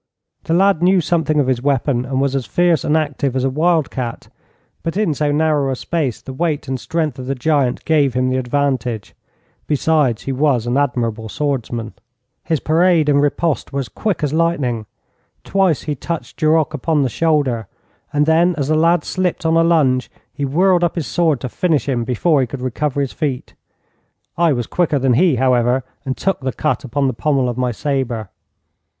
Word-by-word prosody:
The 165 - +1
lad 195 -2 +3
knew 185 +1 +4
something 160 -2 +1
of 145 - +3
his 130 -2 0
weapon, 135 -2 0
and 130 0 -2
was 140 0 0
as 130 -5 -2
fierce 170 - +2
and 150 - +2
active 145 -3 -1
as 130 - 0
a 135 - +1
wild 160 +1 +1
cat, 120 -3 -5 0.5
but 165 +3 -3
in 205 -7 +1
so 145 +1 0
narrow 150 -2 +1
a - - -1
space 140 -4 -3
the 130 - -7
weight 150 0 -2
and 130 0 -3
strength 155 -4 -2
of 125 - -7
the 135 - -1
giant 135 -2 0
gave 145 -5 +2
him 130 0 +1
the 130 - 0
advantage. 130 -4 -1 0.5
Besides, 150 -5 +1
he 135 - -3
was 130 -3 +1
an 120 +1 -1
admirable 115 -5 -1
swordsman. 120 -5 -3 0.5
His 160 -3 0
parade 165 0 +3
and 140 -1 +4
riposte 145 +2 0
were 140 - -2
as 125 - -7
quick 205 -7 -2
as 145 -1 0
lightning. 140 -10 0 0.6
Twice 190 -6 +1
he 150 - -2
touched 165 +4 -5
Duroc 155 0 +2
upon 150 +1 0
the - - +1
shoulder, 135 - 0 0.4
and 145 0 +2
then, 165 +3 +3
as 140 -1 -2
the 155 - +3
lad 165 +1 +3
slipped 180 -2 -2
on 160 0 +3
a 165 - +4
lunge, 140 -7 +2 0.2
he 145 - -3
whirled 175 +5 +2
up 170 - 0
his 165 -4 -2
sword 160 -6 +1
to - - -3
finish 155 +3 0
him 120 -4 -1
before 140 +5 +2
he 130 - 0
could 125 +1 -7
recover 140 +3 -1
his 135 - -3
feet. 140 -6 -3 0.8
I 170 -2 +3
was 120 -4 -1
quicker 165 0 0
than 130 -1 +2
he, 160 +3 +3
however, 125 0 +2 0.2
and 130 - -2
took 195 - -1
the 130 0 -2
cut 155 -1 -1
upon 135 +2 -1
the 130 - +1
pommel 135 +1 0
of 120 - -2
my 125 0 0
sabre. 120 -5 -2
145 Hz, 195 wpm, -18 LUFS, 130-160 Hz, 0.8 s, knew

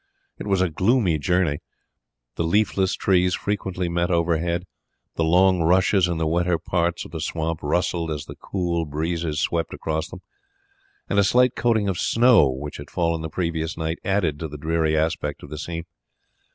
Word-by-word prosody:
It - - -6
was 95 -2 +2
a 95 - 0
gloomy 95 -2 +2
journey. 90 -2 +1 0.7
The 85 - -2
leafless 95 +1 +1
trees 90 -1 +2
frequently 95 -3 -2
met 85 +1 0
overhead; 85 0 0 0.5
the 80 - 0
long 90 +2 +4
rushes 90 +2 +3
in 85 -1 -2
the 80 - 0
wetter 85 +2 +1
parts 85 0 -1
of - - -12
the 80 -1 -5
swamp 80 0 -2
rustled 85 +2 0
as 75 -2 -4
the - - -8
cold 85 -4 -2
breezes 80 0 -2
swept 85 +1 -1
across 80 +1 -3
them, - - -10 0.9
and - - +1
a - - +5
slight 125 +5 +3
coating 110 -4 +1
of 95 -2 -1
snow 115 - +5
which 70 +3 -5
had 70 0 -10
fallen 85 -2 0
the 80 - -4
previous 80 -1 -2
night 80 +1 -3
added 90 -7 0
to 80 - -3
the 75 0 -8
dreary 80 +1 0
aspect 80 -2 -1
of 70 - -11
the 75 - -6
scene. 85 0 -5
85 Hz, 180 wpm, -23 LUFS, 80-90 Hz, 0.9 s, a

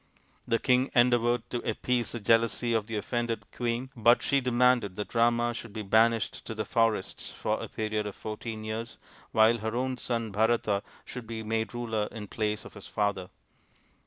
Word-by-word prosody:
The 115 - +3
king 125 +2 +2
endeavoured 120 -1 +3
to 120 - -1
appease 125 0 -1
the 120 - -4
jealousy 115 +2 +2
of 110 -2 0
the 115 - -4
offended 120 +2 -2
queen, 120 +2 -2
but 120 +1 +4
she 140 -1 +2
demanded 125 -5 +3
that 105 - -5
Rama 120 0 +3
should 115 -2 -8
be 110 -1 -4
banished 110 +2 +2
to 115 - -4
the 110 - -2
forests 115 -4 0
for - - -2
a - - -4
period 110 -1 -2
of 105 - -6
fourteen 110 0 -6
years 110 +2 -5 0.3
while 110 +2 +5
her 110 +2 -3
own 130 +1 -1
son 115 -3 -2
Bharata 110 -1 +2 0.2
should 125 -3 -8
be 110 -1 -5
made 110 +1 -2
ruler 110 -3 -1
in 110 -2 -6
place 105 0 -2
of - - -11
his 100 - -11
father. 100 -3 -1
115 Hz, 180 wpm, -29 LUFS, 110-120 Hz, 0.3 s, while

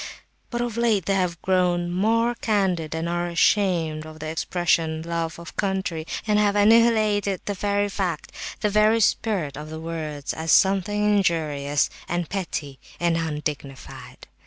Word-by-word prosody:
But 240 -2 -2
of 240 -2 -3
late 225 -6 +2
they 200 - +1
have 180 -3 0
grown, 180 -2 +1
more 225 +6 +2
candid 190 -9 0
and 165 +1 -2
are 175 0 -1
ashamed 170 -3 +1
of 155 0 -11
the 155 0 -5
expression 160 -1 0
'love 165 -1 -3
of 170 +1 -10
country,' 190 -5 -2 0.2
and 210 -1 +2
have 205 -1 +2
annihilated 210 -2 +4
the 205 - -2
very 205 +2 0
spirit 195 - 0
of 150 +1 -7
the 160 0 -6
words 155 -3 -4
as 160 0 -2
something 195 +2 +3
injurious 150 -6 +1 0.2
and 175 -1 -1
petty 150 -8 -4 0.2
and 170 -1 +1
undignified. 150 -4 -5
175 Hz, 135 wpm, -24 LUFS, 160-205 Hz, 0.2 s, annihilated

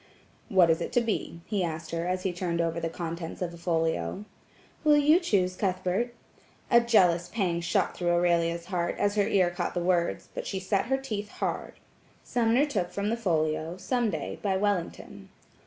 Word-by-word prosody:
"What 180 -4 +5
is 160 - +1
it - - -3
to 245 - +4
be?" 210 -6 -3
he 200 -4 -1
asked 160 -1 -4
her 165 +1 -2
as 185 0 -1
he 190 - -1
turned 170 -1 -2
over 165 0 0
the 165 0 -2
contents 165 0 -5
of 175 -2 -3
a - - -10
folio. 165 - -1 0.6
"Will 300 -1 +6
you 300 +4 +5
choose, 190 - +1
Cuthbert?" 190 +5 -1 0.6
A 235 - +8
jealous 180 -7 +3
pang 180 -6 0
shot 175 +2 0
through 175 -1 -1
Aurelia's 170 -1 +2
heart, 175 -2 -2
as 205 0 +1
her 205 -1 +2
ear 185 -3 +3
caught 175 +1 -3
the - - +1
words, 175 -1 0
but - - -5
she 190 - -2
set 190 +2 0
her 265 +1 +2
teeth 215 -6 -4
hard. - - -3 0.5
Sumner 240 +3 +2
took 200 -12 -2
from 200 +1 -2
the 230 - +1
folio 160 -5 -1
"Some 240 +3 0
Day," 160 -7 -4
by 195 -2 +1
Wellington. 200 -3 -2
180 Hz, 190 wpm, -28 LUFS, 170-210 Hz, 0.6 s, A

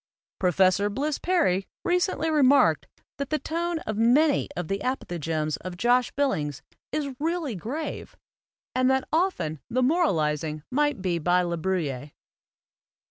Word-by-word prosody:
Professor 185 +2 +3
Bliss 285 +8 -2
Perry 295 - +1 0.2
recently 355 -3 +1
remarked 285 -2 +4 0.3
that 280 -1 -4
the 310 - +1
tone 340 +2 -2
of 215 -1 -3
many 280 +6 +3
of 175 -2 -3
the 195 +2 -1
apothegms 165 - -2
of 180 0 -8
Josh 245 +4 +3
Billings 150 - -1 0.3
is 285 -3 -2
really 325 -3 -1
grave 255 - -5 0.6
and 255 0 +2
that 265 0 +1
often 250 - 0
the 255 +2 +1
moralizing 155 - +1
might 290 -6 +1
be 175 -3 0
by 180 +3 +2
La 170 -1 -1
Bruyere. 155 -6 -2
235 Hz, 135 wpm, -26 LUFS, -, 0.6 s, remarked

